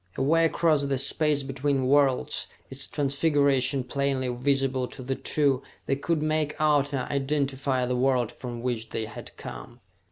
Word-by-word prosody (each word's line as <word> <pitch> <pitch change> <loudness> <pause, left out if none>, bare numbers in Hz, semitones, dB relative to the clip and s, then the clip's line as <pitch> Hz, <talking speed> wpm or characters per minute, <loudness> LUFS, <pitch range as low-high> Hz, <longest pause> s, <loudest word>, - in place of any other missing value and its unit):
Away 165 +5 +3
across 160 -2 +2
the 140 -1 0
space 145 +2 +2
between 135 0 -1
worlds, 135 -1 +2 0.2
its 135 +1 -3
transfiguration 140 -2 +1
plainly 135 0 -1
visible 130 0 0
to 130 - -10
the 135 +2 -1
two, 140 -1 +1 0.2
they 135 - +1
could 155 +2 -1
make 155 -1 0
out 145 -2 +3
and 130 -3 -2
identify 135 -2 0
the 125 0 -1
world 125 -2 +2
from 120 -1 -7
which 115 -3 -2
they 110 - -3
had 105 - -10
come. - - -9
135 Hz, 155 wpm, -27 LUFS, 130-145 Hz, 0.2 s, Away